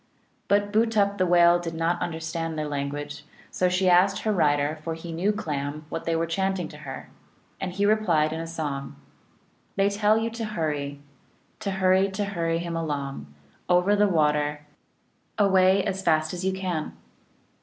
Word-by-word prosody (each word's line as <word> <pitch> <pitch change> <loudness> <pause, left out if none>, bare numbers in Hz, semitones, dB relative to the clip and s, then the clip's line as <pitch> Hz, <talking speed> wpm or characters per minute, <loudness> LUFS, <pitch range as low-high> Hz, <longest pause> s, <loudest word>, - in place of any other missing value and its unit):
But 205 0 +2
Bootup 210 -3 +2
the 185 - +3
Whale 175 0 +5
did 165 -1 -5
not 165 +1 0
understand 165 -1 -3
their 155 -1 -2
language, 145 +1 -4 0.3
so 180 - +1
she 185 +1 +1
asked 185 +2 +4
her 215 - +1
rider 150 -3 +1
for 165 0 -3
he 165 +1 -8
knew 175 +6 +1
Clam 150 -6 -4
what 165 - -5
they 165 - 0
were 165 +1 +1
chanting 190 +1 -1
to 150 - -11
her. 135 -3 -9 0.5
And 185 - -3
he 200 +2 0
replied 175 -8 +2
in 160 - -4
a 165 - -5
song: 150 -4 -4 0.4
" - - -38
They 200 0 +2
tell 210 +1 +3
you 225 +1 -1
to 230 0 -4
hurry 150 -8 -2
(cussal) - - -11
(M.), 140 - -20 0.6
To 210 -2 -3
hurry, 190 +1 +3
to 205 +1 -1
hurry 170 -4 -1
him 170 0 -4
along, 140 - -4 0.4
Over 180 +3 +4
the 205 0 +4
water, 150 -4 +1 0.8
Away 190 -1 +4
as 195 0 -2
fast 155 -3 +1
as 180 0 -5
you 190 - +1
can 180 -5 -3
170 Hz, 180 wpm, -25 LUFS, 155-195 Hz, 0.8 s, Whale